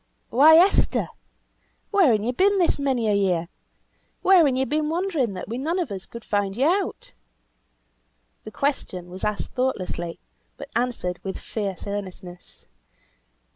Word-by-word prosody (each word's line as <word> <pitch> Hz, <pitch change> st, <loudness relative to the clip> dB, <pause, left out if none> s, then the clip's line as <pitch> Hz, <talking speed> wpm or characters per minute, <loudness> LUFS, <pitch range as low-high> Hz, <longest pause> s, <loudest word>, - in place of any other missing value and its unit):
"Why, 300 Hz, +6 st, +7 dB
Esther! 370 Hz, +4 st, +3 dB, 0.8 s
Where 385 Hz, -, +5 dB
han 210 Hz, -1 st, 0 dB
ye 240 Hz, -, 0 dB
been 390 Hz, +9 st, +2 dB
this 350 Hz, -5 st, +2 dB
many 260 Hz, -5 st, 0 dB
a 210 Hz, -, +2 dB
year? 185 Hz, -4 st, +1 dB, 0.8 s
Where 375 Hz, -2 st, +6 dB
han 265 Hz, -, +1 dB
ye 265 Hz, +1 st, +1 dB
been 300 Hz, +2 st, -1 dB
wandering 320 Hz, -, -1 dB
that 180 Hz, -, -6 dB
we 235 Hz, +4 st, -4 dB
none 325 Hz, +6 st, -1 dB
of 340 Hz, -, -2 dB
us 190 Hz, -2 st, -6 dB
could 235 Hz, -1 st, -10 dB
find 205 Hz, -1 st, -1 dB
you 265 Hz, -, +2 dB
out?" 370 Hz, -, -1 dB, 1.3 s
The -, -, -8 dB
question 195 Hz, -9 st, -3 dB
was 185 Hz, -, -8 dB
asked 210 Hz, -1 st, -2 dB
thoughtlessly, 185 Hz, -9 st, -2 dB, 0.4 s
but 280 Hz, -, -9 dB
answered 230 Hz, -7 st, -1 dB
with 190 Hz, -1 st, -4 dB
fierce 200 Hz, -4 st, -5 dB
earnestness. 185 Hz, -3 st, -8 dB
240 Hz, 150 wpm, -24 LUFS, 195-305 Hz, 1.3 s, Why